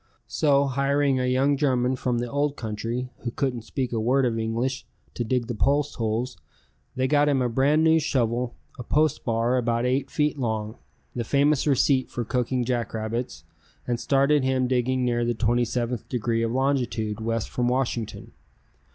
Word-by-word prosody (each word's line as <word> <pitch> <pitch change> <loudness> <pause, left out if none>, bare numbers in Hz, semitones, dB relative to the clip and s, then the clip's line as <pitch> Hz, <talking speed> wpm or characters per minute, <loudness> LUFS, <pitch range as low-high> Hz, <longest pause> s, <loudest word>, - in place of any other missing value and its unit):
So 140 -2 +2
hiring 140 0 +1
a 125 - 0
young 135 +3 +2
German 130 -3 +1
from 125 -1 -1
the 120 +1 -2
Old 145 +3 -1
Country, 115 +3 -4
who 120 - -4
couldn't 125 -1 -2
speak 125 +2 -3
a 115 - 0
word 130 +4 +2
of 115 -2 0
English, 115 +4 -2 0.3
to 120 - -2
dig 125 +1 0
the 120 - -4
post 140 +6 +1
holes, 115 -2 -2 0.6
they 130 0 +1
got 145 +1 +3
him 140 -2 +2
a 125 - +1
brand 140 +6 +2
new 160 0 +5
shovel, 120 -4 -1 0.2
a - - -4
post 150 +4 +1
bar 115 +2 +1
about 120 -1 0
eight 135 +2 0
feet 150 -1 0
long, 110 -2 -3 0.4
the 120 - -1
famous 140 +4 +2
receipt 135 -1 +2
for 120 - -4
cooking 125 +1 -1
jackrabbits, 115 -5 -3 0.4
and 120 -1 -1
started 140 +2 +2
him 130 -1 +1
digging 130 0 +1
near 120 -1 +1
the 120 0 0
27th 120 +1 -1
degree 115 -2 -1
of 115 0 0
longitude 120 -5 0
west 115 0 -2
from 120 -1 0
Washington. 125 -3 -2
125 Hz, 170 wpm, -25 LUFS, 115-135 Hz, 0.6 s, new